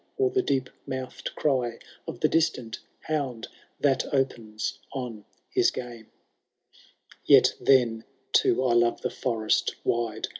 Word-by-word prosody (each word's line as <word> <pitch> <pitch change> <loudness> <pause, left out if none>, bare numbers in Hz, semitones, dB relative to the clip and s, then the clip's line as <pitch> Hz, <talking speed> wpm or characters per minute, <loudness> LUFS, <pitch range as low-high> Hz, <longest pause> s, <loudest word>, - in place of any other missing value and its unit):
Or 400 -1 +2
the 390 0 +2
deep 130 - -1 0.2
mouthed 130 -1 -5
cry 125 -5 0 0.3
of - - -7
the - - +5
distant 130 -8 0 0.2
hound 135 -7 -3 0.3
That 135 -3 +2
opens 115 -6 -2
on 120 -6 -6 0.3
his - - +4
game: 120 -3 -8 1.2
Yet - - +6
then, 120 -4 +3 0.3
too, 130 - +4
I 120 - +3
love 120 0 +2
the - - -2
forest 110 -4 0
wide. 115 -2 -1
125 Hz, 125 wpm, -27 LUFS, 115-135 Hz, 1.2 s, Yet